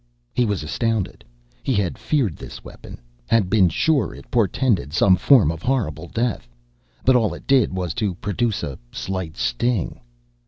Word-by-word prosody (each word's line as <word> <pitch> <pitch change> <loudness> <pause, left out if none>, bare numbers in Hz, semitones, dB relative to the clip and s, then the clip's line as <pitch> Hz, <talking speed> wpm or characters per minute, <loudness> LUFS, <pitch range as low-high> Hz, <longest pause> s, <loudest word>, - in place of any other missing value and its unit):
He 125 - +2
was 100 -6 -1
astounded. 110 +6 -2 0.4
He - - 0
had 100 -4 0
feared 125 - 0
this - - -10
weapon, - - -11 0.3
had 105 -5 +2
been 95 -5 +5
sure 145 - +1
it - - -14
portended 110 - +1
some 95 +2 +5
form 95 - +5
of 85 0 -7
horrible 90 - -1
death. 115 - -2 0.6
But 130 - +5
all 110 -8 +2
it - - -12
did 135 -4 +3
was 90 -3 -3
to 100 -4 0
produce 105 +3 -1
a 70 - -5
slight 95 -4 -4
sting. 95 - -1
100 Hz, 160 wpm, -22 LUFS, 85-120 Hz, 0.6 s, been